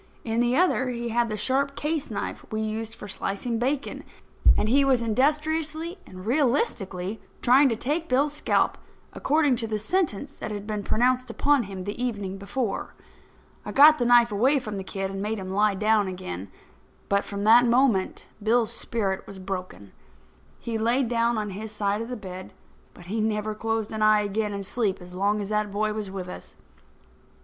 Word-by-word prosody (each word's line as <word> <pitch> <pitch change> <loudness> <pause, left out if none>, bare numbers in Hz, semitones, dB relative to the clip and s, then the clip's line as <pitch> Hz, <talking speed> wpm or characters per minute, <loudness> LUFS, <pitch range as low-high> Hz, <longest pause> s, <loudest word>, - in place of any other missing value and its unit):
In 225 0 -1
the 240 +1 +2
other 315 -7 +2
he 235 -1 -3
had 235 0 +1
the 215 - -3
sharp 275 +5 0
case 305 -1 -2
knife 210 - -4
we 215 - -2
used 220 +1 -4
for 210 - -9
slicing 205 +4 -3
bacon; 270 +3 -2 0.5
and 210 - +1
he 275 +5 +4
was 260 -3 +3
industriously 310 - 0
and 185 0 -11
realistically 225 - 0 0.2
trying 265 +3 +6
to 230 - 0
take 300 +8 -2
Bill's 280 +3 +2
scalp, 300 - +1 0.3
according 290 -3 +2
to 230 - -1
the 215 -1 -1
sentence 280 - -1
that - - -6
had 205 -1 -5
been 210 -1 -3
pronounced 250 +4 +1
upon 285 -4 +2
him 190 -1 -7
the 205 +5 -4
evening 200 -5 -3
before. 200 +2 -3 0.7
I - - -6
got 305 +2 +7
the 245 - +1
knife 240 -1 +5
away 255 +8 +3
from 215 -6 -4
the 190 - -4
kid 195 0 -4
and 195 0 -5
made 215 +2 -2
him 190 -1 -6
lie 205 +1 +2
down 210 0 +2
again. 100 - -6 0.6
But, 200 0 +2
from 200 0 -5
that 235 +3 +6
moment, 235 -5 +2 0.2
Bill's 225 +1 +2
spirit 195 -5 -2
was 200 - -9
broken. 185 - -6 0.7
He 230 -1 -4
laid 235 +2 +2
down 235 -1 +1
on 210 -1 -2
his 210 +3 -6
side 210 0 -1
of 230 - -5
the 250 - -4
bed, 185 -2 -9 0.4
but - - -13
he 215 +5 -2
never 215 0 -1
closed 225 0 -2
an 220 -1 -4
eye 215 0 +5
again 210 +1 -1
in 200 -1 -4
sleep 205 -1 -1
as 180 0 -12
long 200 +3 +1
as 200 - -5
that 210 -1 0
boy 215 +1 0
was 210 -2 -4
with 190 -1 -6
us. 180 - -9
220 Hz, 190 wpm, -26 LUFS, 200-250 Hz, 0.7 s, got